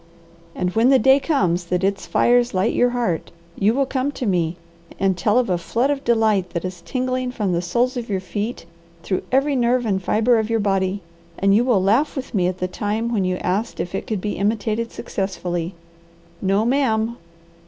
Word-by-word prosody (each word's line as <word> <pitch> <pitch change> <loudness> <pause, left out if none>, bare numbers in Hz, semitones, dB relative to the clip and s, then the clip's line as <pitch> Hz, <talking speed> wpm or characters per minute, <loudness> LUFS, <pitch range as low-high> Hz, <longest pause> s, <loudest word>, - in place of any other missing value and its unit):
And 180 0 -1
when 230 +3 +4
the 270 - +6
day 265 +3 +5
comes 185 - 0
that 180 +1 -1
its 195 0 -1
fires 245 -2 +3
light 190 +5 +1
your 245 - +3
heart, 240 -9 -1 0.3
you 210 +4 +2
will 275 0 +2
come 265 +1 -1
to 255 - -4
me, 175 -4 0 0.4
and 195 -1 +2
tell 210 +5 +1
of 250 -1 +2
a 180 -2 0
flood 235 +10 0
of 280 -1 -2
delight 220 -5 +2
that 170 - -2
is 180 -1 -6
tingling 255 +1 -2
from 210 -6 -1
the 170 - 0
soles 240 +9 0
of 235 -2 -5
your 195 -2 0
feet 205 +3 -4 0.4
through 185 - -1
every 275 +2 +2
nerve 245 0 +2
and 195 -3 0
fibre 225 +5 +2
of 220 0 -2
your 225 0 +1
body, 195 -1 0 0.3
and 195 0 +3
you 220 +4 +4
will 235 -7 +2
laugh 225 +10 +2
with 265 -2 -6
me 180 -4 +2
at 185 0 -2
the 185 - -2
time 215 +5 -2
when 200 -4 +1
you 185 0 0
asked 195 +6 -2
if 175 - -3
it - - -4
could 215 -4 -2
be 210 +1 -3
imitated 215 +2 -1
successfully. 180 -3 -3 0.7
No, 195 +3 +2
ma'am! 235 -3 +1
215 Hz, 205 wpm, -21 LUFS, 185-245 Hz, 0.7 s, the